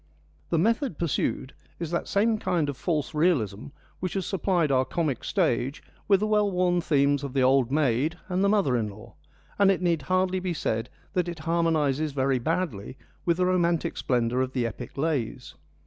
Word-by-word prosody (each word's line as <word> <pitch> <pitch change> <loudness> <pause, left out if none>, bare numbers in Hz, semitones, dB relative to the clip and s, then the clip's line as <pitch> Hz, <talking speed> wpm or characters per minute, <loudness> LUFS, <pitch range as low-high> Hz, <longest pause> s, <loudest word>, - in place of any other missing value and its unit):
The 165 - +1
method 225 - +1
pursued 145 -4 -1 0.2
is 170 -2 -5
that 170 - -1
same 220 +2 +2
kind 165 -8 0
of 140 - -3
false 150 +1 -2
realism 140 - +1 0.3
which 185 0 -3
has 190 -3 -1
supplied 175 -5 +1
our 130 -1 +3
comic 145 -3 -2
stage 140 - 0 0.2
with 195 -1 +4
the - - +2
well 210 -1 +2
worn 180 -1 +1
themes 145 -2 +2
of 140 -2 -5
the 135 -2 +2
old 130 -1 +3
maid 145 +2 +1
and 185 +1 0
the 200 - +4
mother 200 -12 +2
in 110 -3 0
law, 110 +2 -13 0.5
and 200 -1 +6
it 195 - +2
need 170 -3 +1
hardly 185 +4 +1
be 180 -2 -3
said 115 -4 -2 0.2
that 180 -1 0
it 170 - -6
harmonises 155 -3 +1
very 135 -1 +1
badly 135 - -2 0.3
with 170 -1 +2
the 180 - +2
romantic 175 -2 +1
splendour 125 0 0
of 130 0 -2
the 125 -3 0
epic 115 +3 -6
lays. 135 -4 -2
160 Hz, 185 wpm, -26 LUFS, 130-180 Hz, 0.5 s, and